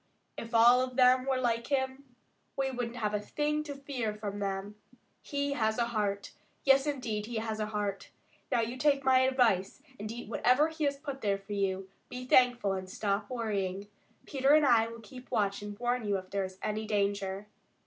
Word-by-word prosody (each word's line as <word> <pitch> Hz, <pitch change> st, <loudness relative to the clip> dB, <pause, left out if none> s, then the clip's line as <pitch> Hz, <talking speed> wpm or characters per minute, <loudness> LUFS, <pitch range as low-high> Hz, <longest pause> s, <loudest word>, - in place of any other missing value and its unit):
If 230 Hz, +1 st, -6 dB
all 240 Hz, +2 st, +7 dB
of 255 Hz, -1 st, -3 dB
them 255 Hz, 0 st, +5 dB
were 265 Hz, -1 st, +2 dB
like 235 Hz, -2 st, 0 dB
him, 265 Hz, -1 st, -2 dB, 0.4 s
we 270 Hz, -1 st, 0 dB
wouldn't 245 Hz, -2 st, -4 dB
have 210 Hz, -3 st, -2 dB
a 210 Hz, -, +1 dB
thing 300 Hz, +7 st, -1 dB
to 285 Hz, -2 st, -6 dB
fear 260 Hz, -6 st, -3 dB
from 205 Hz, -1 st, -5 dB
them. 195 Hz, 0 st, -3 dB, 0.5 s
He 280 Hz, -1 st, -2 dB
has 220 Hz, -4 st, 0 dB
a 235 Hz, -1 st, +1 dB
heart. 205 Hz, -3 st, -2 dB, 0.3 s
Yes, 270 Hz, +1 st, +5 dB
indeed, 225 Hz, -7 st, -2 dB
he 240 Hz, -, -6 dB
has 220 Hz, 0 st, -2 dB
a 215 Hz, -, -1 dB
heart. 210 Hz, -2 st, -3 dB, 0.4 s
Now 235 Hz, -, +3 dB
you 235 Hz, +3 st, -3 dB
take 280 Hz, 0 st, +2 dB
my 260 Hz, -1 st, +5 dB
advice 250 Hz, -4 st, +2 dB, 0.2 s
and 215 Hz, +1 st, -5 dB
eat 240 Hz, 0 st, -7 dB
whatever 250 Hz, +7 st, +3 dB
he 315 Hz, -1 st, -2 dB
has 280 Hz, 0 st, 0 dB
put 280 Hz, -2 st, -6 dB
there 200 Hz, -2 st, +1 dB
for 195 Hz, +1 st, -8 dB
you, 190 Hz, -1 st, -1 dB, 0.2 s
be 250 Hz, 0 st, -6 dB
thankful, 245 Hz, -5 st, +4 dB
and 185 Hz, -1 st, -5 dB
stop 205 Hz, +1 st, -2 dB
worrying. 205 Hz, -5 st, -2 dB, 0.4 s
Peter 275 Hz, +1 st, +3 dB
and 305 Hz, -1 st, +5 dB
I 230 Hz, -4 st, +5 dB
will 230 Hz, 0 st, -9 dB
keep 250 Hz, +4 st, -12 dB
watch 205 Hz, -4 st, 0 dB
and 205 Hz, 0 st, -7 dB
warn 245 Hz, -1 st, -1 dB
you 200 Hz, -1 st, +1 dB
if 185 Hz, 0 st, -9 dB
there 200 Hz, -1 st, 0 dB
is 185 Hz, 0 st, -10 dB
any 215 Hz, +1 st, -2 dB
danger." 200 Hz, -1 st, -1 dB
230 Hz, 200 wpm, -31 LUFS, 205-260 Hz, 0.5 s, all